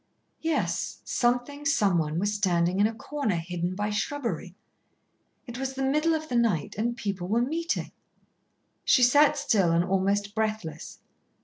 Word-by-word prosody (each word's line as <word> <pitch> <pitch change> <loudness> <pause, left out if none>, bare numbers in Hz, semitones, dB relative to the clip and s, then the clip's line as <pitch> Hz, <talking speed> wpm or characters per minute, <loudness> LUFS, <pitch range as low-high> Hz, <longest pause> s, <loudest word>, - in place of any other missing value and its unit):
Yes, 325 -1 -1
something, 245 +4 0
someone, 175 - +1
was 205 +4 0
standing 180 -3 +1
in 205 - +5
a 225 - -5
corner, 280 -5 -2
hidden 175 +2 -3
by 210 +2 -2
shrubbery. 210 - -3 0.9
It 240 -1 -7
was 265 0 -3
the 270 0 -3
middle 305 +4 +2
of 315 0 -4
the 250 - -3
night, 220 -11 +1
and 235 +3 -1
people 195 -5 -3
were 230 +5 +2
meeting. 330 +6 -2 0.9
She 250 - +4
sat 290 +4 +5
still 195 -10 +2
and 170 +1 +2
almost 200 +2 0
breathless. 215 -8 -3
215 Hz, 145 wpm, -27 LUFS, 185-270 Hz, 0.9 s, in